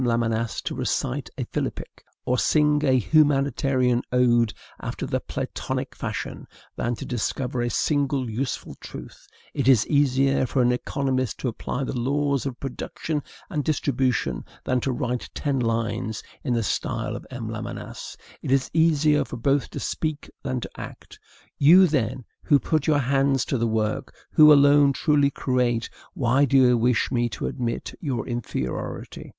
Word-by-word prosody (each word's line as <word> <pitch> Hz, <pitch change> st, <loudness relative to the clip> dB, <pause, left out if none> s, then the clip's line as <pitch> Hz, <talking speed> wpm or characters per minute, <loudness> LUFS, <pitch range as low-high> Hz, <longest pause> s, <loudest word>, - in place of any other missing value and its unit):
Lamennais 115 Hz, -1 st, 0 dB
to -, -, -3 dB
recite 60 Hz, -, -2 dB
a -, -, -2 dB
philippic, -, -, -5 dB, 0.2 s
or 125 Hz, 0 st, +1 dB
sing 150 Hz, -1 st, +3 dB
a 135 Hz, -3 st, +3 dB
humanitarian 135 Hz, -2 st, +2 dB
ode 120 Hz, -3 st, +3 dB, 0.3 s
after -, -, -4 dB
the -, -, -1 dB
Platonic -, -, -4 dB
fashion, -, -, -5 dB, 0.3 s
than 120 Hz, +1 st, -1 dB
to -, -, -7 dB
discover 125 Hz, +1 st, -2 dB
a 120 Hz, -, 0 dB
single 140 Hz, 0 st, 0 dB
useful 120 Hz, +3 st, -3 dB
truth; -, -, -10 dB, 0.3 s
it 140 Hz, -3 st, -1 dB
is 125 Hz, -5 st, +6 dB
easier 135 Hz, -2 st, +2 dB
for 130 Hz, +1 st, +1 dB
an 120 Hz, -, +3 dB
economist 130 Hz, -1 st, -1 dB
to -, -, -3 dB
apply 125 Hz, +3 st, -4 dB
the 135 Hz, -, -3 dB
laws 140 Hz, +2 st, 0 dB
of 130 Hz, -3 st, -6 dB
production 145 Hz, +3 st, -4 dB, 0.3 s
and 150 Hz, -7 st, -2 dB
distribution 130 Hz, -, 0 dB, 0.2 s
than 130 Hz, -, +1 dB
to 135 Hz, -, 0 dB
write 125 Hz, -1 st, -3 dB
ten 140 Hz, -2 st, -1 dB
lines 115 Hz, -2 st, -1 dB, 0.2 s
in 125 Hz, -, 0 dB
the 115 Hz, -, +1 dB
style -, -, -2 dB
of -, -, -8 dB
M. -, -, -6 dB
Lamennais; -, -, -6 dB, 0.2 s
it -, -, -5 dB
is 135 Hz, 0 st, +2 dB
easier 155 Hz, -2 st, +3 dB
for 125 Hz, -, -7 dB
both 140 Hz, +4 st, +1 dB
to -, -, -6 dB
speak 155 Hz, -2 st, -3 dB
than 130 Hz, -2 st, -2 dB
to 95 Hz, -, -8 dB
act. -, -, -10 dB, 0.4 s
You, 175 Hz, +7 st, +8 dB
then, 130 Hz, -6 st, -1 dB, 0.2 s
who 145 Hz, -, +5 dB
put 155 Hz, +1 st, 0 dB
your 155 Hz, -2 st, +4 dB
hands 135 Hz, -1 st, +2 dB
to 135 Hz, -, -1 dB
the 115 Hz, -, +1 dB
work, 110 Hz, -1 st, -1 dB, 0.2 s
who 150 Hz, 0 st, +8 dB
alone 140 Hz, -1 st, +6 dB
truly 145 Hz, 0 st, +3 dB
create, 125 Hz, -4 st, 0 dB, 0.2 s
why 130 Hz, +3 st, +3 dB
do 140 Hz, 0 st, +3 dB
you 125 Hz, -2 st, +6 dB
wish 120 Hz, 0 st, +1 dB
me 120 Hz, -2 st, +1 dB
to 105 Hz, -, -5 dB
admit 120 Hz, -3 st, -3 dB
your 130 Hz, -8 st, -2 dB
inferiority? 120 Hz, -, -4 dB
130 Hz, 160 wpm, -24 LUFS, 120-140 Hz, 0.4 s, You